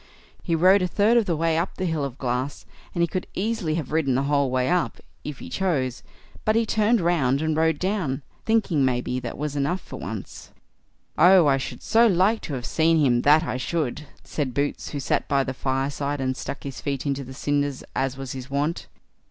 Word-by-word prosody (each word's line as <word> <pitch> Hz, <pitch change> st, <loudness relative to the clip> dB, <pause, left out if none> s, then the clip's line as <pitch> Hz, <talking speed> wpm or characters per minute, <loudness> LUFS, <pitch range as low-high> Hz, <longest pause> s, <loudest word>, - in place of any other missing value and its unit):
He 165 Hz, -, 0 dB
rode 185 Hz, +4 st, +5 dB
a 180 Hz, -, +1 dB
third 205 Hz, +6 st, +3 dB
of 235 Hz, -3 st, +4 dB
the 170 Hz, -, +1 dB
way 165 Hz, +1 st, +1 dB
up 175 Hz, -, -3 dB
the 185 Hz, -, -3 dB
hill 160 Hz, -4 st, -1 dB
of 135 Hz, -2 st, -4 dB
glass, 130 Hz, +2 st, -3 dB, 0.3 s
and 170 Hz, -, +2 dB
he -, -, +3 dB
could 185 Hz, +3 st, -4 dB
easily 200 Hz, -6 st, -1 dB
have 155 Hz, -5 st, -4 dB
ridden 150 Hz, -5 st, +1 dB
the 135 Hz, -, +1 dB
whole 140 Hz, -1 st, +2 dB
way 130 Hz, 0 st, +1 dB
up, 170 Hz, -9 st, 0 dB, 0.3 s
if 150 Hz, -2 st, -6 dB
he -, -, -9 dB
chose; 140 Hz, -10 st, -1 dB, 0.4 s
but 215 Hz, -, +2 dB
he 230 Hz, 0 st, +3 dB
turned 220 Hz, +2 st, +2 dB
round 155 Hz, -7 st, +2 dB
and 160 Hz, 0 st, 0 dB
rode 160 Hz, -1 st, +2 dB
down, 180 Hz, -8 st, -1 dB, 0.2 s
thinking, 210 Hz, -10 st, +2 dB
maybe, 125 Hz, 0 st, 0 dB
that 120 Hz, -2 st, -6 dB
was 150 Hz, 0 st, -3 dB
enough 145 Hz, +6 st, 0 dB
for -, -, -10 dB
once." -, -, -7 dB, 0.7 s
"Oh! 180 Hz, +1 st, +7 dB
I 140 Hz, -2 st, +4 dB
should 135 Hz, -, -6 dB
so 230 Hz, +2 st, +5 dB
like 200 Hz, +3 st, +3 dB
to 145 Hz, -, -4 dB
have 125 Hz, -2 st, -5 dB
seen 165 Hz, 0 st, +2 dB
him, 125 Hz, -6 st, +3 dB
that 150 Hz, +4 st, +5 dB
I 130 Hz, -, -2 dB
should", 150 Hz, 0 st, -2 dB, 0.2 s
said 135 Hz, -5 st, -3 dB
Boots, 145 Hz, 0 st, -1 dB
who 145 Hz, -, -4 dB
sat 130 Hz, -, 0 dB
by 140 Hz, -1 st, +2 dB
the 130 Hz, -, -4 dB
fireside, 140 Hz, +2 st, -2 dB
and 130 Hz, -1 st, -1 dB
stuck 140 Hz, -, -6 dB
his 135 Hz, -2 st, -6 dB
feet 140 Hz, -1 st, -3 dB
into 140 Hz, -1 st, -1 dB
the 130 Hz, 0 st, -10 dB
cinders, 145 Hz, -1 st, -1 dB
as 135 Hz, 0 st, -1 dB
was 135 Hz, -2 st, -6 dB
his 130 Hz, 0 st, -7 dB
wont. 145 Hz, +5 st, -1 dB
145 Hz, 215 wpm, -24 LUFS, 135-175 Hz, 0.7 s, Oh